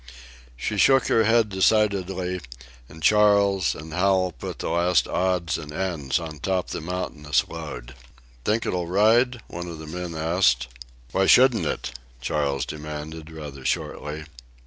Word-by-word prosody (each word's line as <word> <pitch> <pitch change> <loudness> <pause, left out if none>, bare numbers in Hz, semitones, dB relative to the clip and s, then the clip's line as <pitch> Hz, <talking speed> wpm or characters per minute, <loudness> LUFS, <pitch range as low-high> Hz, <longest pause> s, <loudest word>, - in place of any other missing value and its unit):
She 105 - -3
shook 135 +2 +5
her 110 - +4
head 115 0 +3
decidedly, 95 -2 +1 0.5
and 80 0 -12
Charles 100 -3 +4
and 80 0 -9
Hal 95 +1 +2
put 65 - -7
the - - -3
last 85 0 +2
odds 90 -2 0
and 75 -2 -8
ends 75 -5 -1
on 80 -3 -7
top 95 +3 -1
the - - -4
mountainous 80 -4 -1
load. - - -7 0.5
"Think 110 - 0
it'll 90 -2 -1
ride?" 115 +6 +3
one 85 +1 -7
of 85 -2 -7
the 80 - -9
men 85 +1 -5
asked. 80 -6 +2 0.4
"Why 95 0 +2
shouldn't 125 -3 +5
it?" 60 -1 -4 0.2
Charles 70 +1 -1
demanded 75 +1 -7
rather 75 -4 -8
shortly. 75 +3 -3
90 Hz, 145 wpm, -24 LUFS, 75-100 Hz, 0.5 s, shook